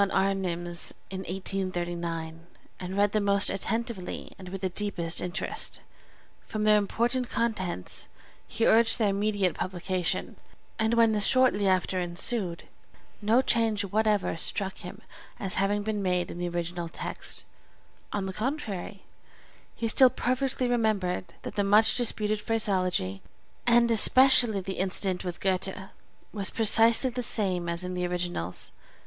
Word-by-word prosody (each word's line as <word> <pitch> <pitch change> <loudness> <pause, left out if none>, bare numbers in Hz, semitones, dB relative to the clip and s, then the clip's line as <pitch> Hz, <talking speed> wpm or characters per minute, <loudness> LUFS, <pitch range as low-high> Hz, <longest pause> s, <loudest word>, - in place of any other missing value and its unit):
Arnim's 175 -3 -1 0.2
in 190 - -5
1839, 175 -3 -3 0.3
and 185 +1 -5
read 205 0 +3
them 215 -1 0
most 200 0 +4
attentively 220 -1 -3
and 185 -1 -9
with 195 +1 -7
the 190 - -1
deepest 180 -4 0
interest. 180 -1 -3 0.7
From 215 -1 -3
their 210 0 +5
important 240 +5 -1
contents, 185 - -3 0.4
he 225 - -1
urged 225 0 +4
their 215 -4 +2
immediate 200 -2 0
publication; 185 0 -3 0.4
and 220 +1 +1
when 230 -1 +4
this 210 -1 +5
shortly 255 -6 +3
after 185 0 +1
ensued, 175 +1 -1 0.6
no 225 +5 +3
change 225 -4 +1
whatever 210 -1 0
struck 190 +3 -2
him 195 +5 -10 0.4
as 190 -2 +2
having 205 +1 0
been 210 -1 -2
made 180 -2 -1
in 175 - -8
the 175 0 -2
original 175 0 -4
text; - - -5 0.7
on 200 -2 -2
the 190 - -5
contrary, 215 - -4 0.7
he 230 - -2
still 255 +3 +6
perfectly 255 +1 -1
remembered 200 -7 -1
that - - -6
the 205 - 0
much 215 +2 +4
disputed 215 -3 +1
phraseology 185 - -1 0.5
(and 235 0 +4
especially 240 -2 +5
the 190 +1 -6
incident 190 0 0
with 180 -2 -5
Goethe) 190 0 0 0.6
was 200 -3 +2
precisely 225 +3 +4
the 250 - -4
same 185 -7 +2
as 170 +1 0
in 180 0 -4
the 180 0 -2
originals. 175 - -3
195 Hz, 140 wpm, -27 LUFS, 180-220 Hz, 0.7 s, still